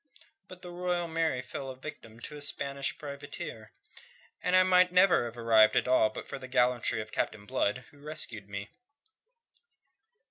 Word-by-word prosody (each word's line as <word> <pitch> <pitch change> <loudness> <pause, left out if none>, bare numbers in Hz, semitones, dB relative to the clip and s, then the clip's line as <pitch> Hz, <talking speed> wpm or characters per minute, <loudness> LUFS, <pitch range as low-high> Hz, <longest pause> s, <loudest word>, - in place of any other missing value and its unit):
"But 185 0 -13
the 180 - -7
Royal 175 -1 -1
Mary 160 -6 0
fell 135 +2 -6
a 130 - -6
victim 120 -5 -10
to 150 - -7
a 145 - -9
Spanish 140 -1 -2
privateer, 140 -6 -8 0.7
and 180 - +2
I 185 - +7
might 180 -1 +5
never 180 -7 +5
have 120 0 -7
arrived 110 -2 +5
at - - +2
all 125 -4 +4
but 110 - -8
for - - -6
the 130 - -8
gallantry 125 -3 +2
of 110 0 -9
Captain 105 -1 -2
Blood, 105 +4 0
who 145 - -19
rescued 125 -9 -4
me." 100 +1 -6
135 Hz, 170 wpm, -30 LUFS, 115-165 Hz, 0.7 s, I